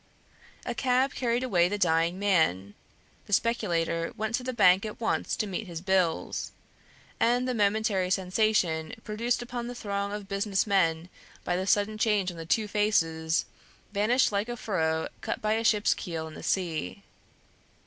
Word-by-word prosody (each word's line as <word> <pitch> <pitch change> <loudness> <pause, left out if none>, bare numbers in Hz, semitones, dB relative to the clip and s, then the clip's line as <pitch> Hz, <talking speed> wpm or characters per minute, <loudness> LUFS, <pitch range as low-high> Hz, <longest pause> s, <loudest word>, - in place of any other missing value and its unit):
A - - -2
cab 260 +1 +1
carried 240 0 0
away 180 -8 +3
the 205 - -2
dying 170 -1 +2
man; 160 - +1 0.5
the 205 - -4
speculator 170 -7 0
went 220 +1 -2
to 250 - 0
the 255 - -2
bank 190 -5 +5
at 215 -1 -6
once 225 - -1
to 215 - -1
meet 200 +1 -4
his 170 -2 -6
bills; 185 -2 0 0.7
and 245 +2 +2
the 255 - 0
momentary 205 -3 +1
sensation 190 -2 +1
produced 235 +3 -1
upon 240 0 -5
the 245 - -6
throng 200 -3 -3
of 205 -1 -6
business 200 0 0
men 170 -5 +1 0.4
by 175 - -1
the 185 +1 -2
sudden 210 +1 +1
change 210 -4 +2
on 170 - -11
the 165 -1 -7
two 215 +4 +1
faces, 165 -6 +1 0.5
vanished 220 +6 +3
like 205 +2 -1
the 240 0 -5
furrow 160 -7 -1
cut - - -3
by 215 0 0
a 225 +1 0
ship's 210 -2 +3
keel 165 -3 -5
in 160 - -10
the - - -9
sea. 165 - -2
200 Hz, 170 wpm, -28 LUFS, 170-220 Hz, 0.7 s, bank